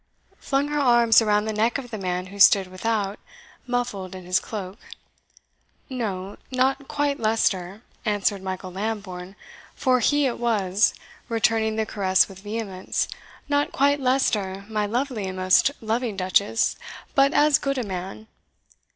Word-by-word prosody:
flung 275 +1 0
her 295 0 -1
arms 240 -4 +5
around 210 -1 +2
the 220 - -2
neck 225 +4 +1
of 250 -3 -8
the 220 - -4
man 180 -1 -2
who 200 - -10
stood 195 0 +7
without, 200 +2 -2 0.5
muffled 225 -7 -3
in 185 -1 -9
his 185 +1 +2
cloak. 200 -1 -7 1.1
"No 200 -6 -4
not 265 +1 0
quite 290 -1 -1
Leicester," 210 -2 0 0.2
answered 205 -2 0
Michael 185 -1 -5
Lambourne, 195 -2 -5 0.4
for 255 -2 +2
he 290 +4 +2
it 250 - -1
was, 210 -4 +2 0.3
returning 225 -1 +1
the 220 0 0
caress 190 -3 +2
with 195 -1 -12
vehemence 205 -2 -3 0.4
"not 290 0 +1
quite 285 +1 +2
Leicester, 210 -7 0
my 210 -1 -1
lovely 240 -2 -2
and 185 0 -5
most 185 +7 +4
loving 225 -1 -2
duchess, 200 +4 +1 0.4
but 275 0 +4
as 295 -1 +4
good 275 -1 -1
a 250 - -1
man." 190 +1 -6
215 Hz, 145 wpm, -24 LUFS, 190-245 Hz, 1.1 s, stood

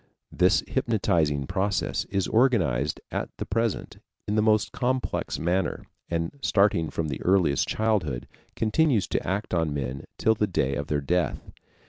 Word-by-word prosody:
This - - +3
hypnotizing 80 -10 +1
process 95 +6 -1
is 95 -2 -1
organized 85 - +2
at - - -2
the - - -4
present 115 0 -2 0.3
in 105 - -1
the 110 - +3
most 110 -1 +2
complex 130 +1 -1
manner, 90 +2 -1 0.2
and 85 +11 -2
starting 100 - +2
from 80 -2 -2
their 70 - -4
earliest 90 -7 +2
childhood, 100 - 0 0.3
continues 115 0 +2
to - - -1
act 100 +1 -2
on 80 -4 +1
men 65 -1 -4
till 110 - +3
the 105 -1 0
day 70 -7 0
of 70 +2 -3
their 75 -2 0
death. 90 +5 -1
95 Hz, 150 wpm, -26 LUFS, 75-110 Hz, 0.3 s, This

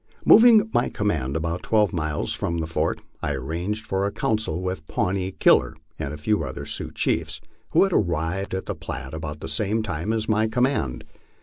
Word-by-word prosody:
Moving 225 -1 +8
m}^ 120 - +1
command 80 -11 -1
about 85 +2 -2
twelve 105 -4 +2
miles 80 -3 -1
from 85 - -2
the 80 - -1
fort, 80 0 -1 0.2
I 75 - -1
arranged 85 +11 -3
for 95 -2 -1
a - - -3
council 105 -8 -1
with 90 -4 -4
Pawnee 95 -4 -1
Killer - - +4 0.2
and 70 - -3
a 75 - -6
few 90 +4 0
other 65 -2 -6
Sioux - - -5
chiefs, - - -1 0.3
who - - +6
had 195 -2 +1
arrived 90 - 0
at 95 - -4
the - - -3
Platte 65 0 -7
about 75 -1 -6
the - - -5
same 105 +8 0
time 90 +1 -2 0.2
my 110 0 +2
command 125 - 0
had. - - -30
90 Hz, 190 wpm, -24 LUFS, 80-110 Hz, 0.3 s, Moving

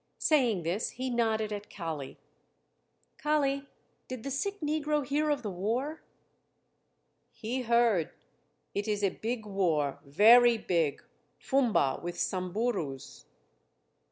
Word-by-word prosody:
Saying 245 - +2
this, 175 +7 -1
he 255 0 -2
nodded 220 -2 0
at 205 0 -7
Kali. 160 -7 -6 1.0
"Kali, 280 -2 +1 0.4
did 255 -3 -6
the 275 - -4
sick 400 +9 -2
negro 300 -1 0
hear 300 +3 0
of 285 -3 0
the 210 - -3
war?" 235 - -2 1.3
"He 245 +4 -4
heard. 235 -8 +3 0.6
It 205 +2 -2
is 205 -1 -1
a 195 - +4
big 225 +2 -4
war, 165 -9 0
very 230 - +6
big 165 -8 0 0.3
Fumba 235 - +1
with 175 0 -5
Samburus." 185 - -3
225 Hz, 115 wpm, -30 LUFS, 185-265 Hz, 1.3 s, very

